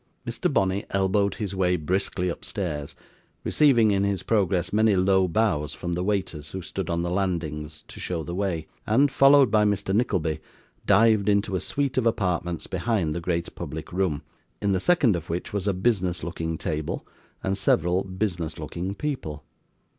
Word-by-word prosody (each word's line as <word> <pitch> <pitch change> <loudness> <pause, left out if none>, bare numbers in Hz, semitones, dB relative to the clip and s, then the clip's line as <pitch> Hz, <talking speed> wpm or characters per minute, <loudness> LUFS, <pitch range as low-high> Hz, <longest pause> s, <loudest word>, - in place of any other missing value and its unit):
Mr. - - -1
Bonney 95 +1 +1
elbowed 100 +1 +1
his 100 -3 -4
way 90 -1 +2
briskly 90 +2 -1
upstairs, 85 -4 -4 0.5
receiving 120 -8 +4
in 100 -1 +2
his 100 -1 -1
progress 95 -4 +1
many 110 -1 +4
low 95 0 +3
bows 85 -6 0
from 85 -1 -4
the 90 +1 -1
waiters 90 -7 -2
who 95 - -5
stood 85 +3 -4
on 85 0 0
the 85 - -1
landings 80 -5 -2
to - - -11
show 85 -3 -3
the 85 - -5
way; 90 -4 -1 0.2
and, 135 +6 +4
followed 135 -3 +6
by 105 -1 +4
Mr. 100 -2 0
Nickleby, 95 -9 +1 0.5
dived 105 0 +5
into 100 -1 +2
a - - +1
suite 140 +3 -1
of 120 - +1
apartments 90 -6 -1
behind 95 -4 -1
the 85 - -3
great 85 -1 -2
public - - -7
room: 90 -5 0 0.4
in 100 - +1
the 95 - +2
second 130 - +3
of 85 0 -6
which 85 +4 -3
was 100 -1 -1
a - - +4
business 95 -4 0
looking 80 -1 -3
table, 75 -2 -3 0.4
and 95 +1 0
several 90 -1 +2
business 95 -5 -3
looking 85 +5 -4
people. 115 - -4
95 Hz, 170 wpm, -25 LUFS, 85-105 Hz, 0.5 s, followed